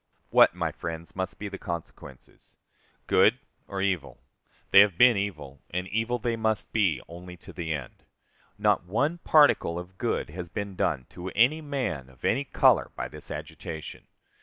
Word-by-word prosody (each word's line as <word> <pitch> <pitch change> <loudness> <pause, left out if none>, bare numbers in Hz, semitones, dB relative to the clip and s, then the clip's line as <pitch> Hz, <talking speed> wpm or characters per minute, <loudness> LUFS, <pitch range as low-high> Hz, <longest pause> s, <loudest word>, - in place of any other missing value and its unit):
What, - - +6
my - - -1
friends, 85 0 -7
must 95 0 -3
be 105 - -5
the 100 -1 -7
consequences? 85 -6 -9 0.5
Good - - +4 0.3
or 95 -1 -3
evil? 95 -5 -1 0.5
They 100 - +9
have 100 -4 +5
been 120 +1 +7
evil, 75 -10 -4
and 90 +2 -3
evil 115 +3 0
they 120 0 -1
must 110 -1 -1
be 95 - +1
only 90 +1 -10
to - - -13
the 85 -3 -4
end. 70 -6 -6 0.5
Not - - +2
one 145 - 0
particle 145 - +4
of 90 +1 -9
good - - -1
has 90 +1 -7
been 100 +2 -5
done 65 - 0
to 90 +1 -6
any 130 +9 +4
man, 130 - -3
of 65 -2 -11
any 140 - +1
color, - - +3
by - - -4
this - - -7
agitation. 80 -1 -7
95 Hz, 165 wpm, -27 LUFS, 85-110 Hz, 0.5 s, They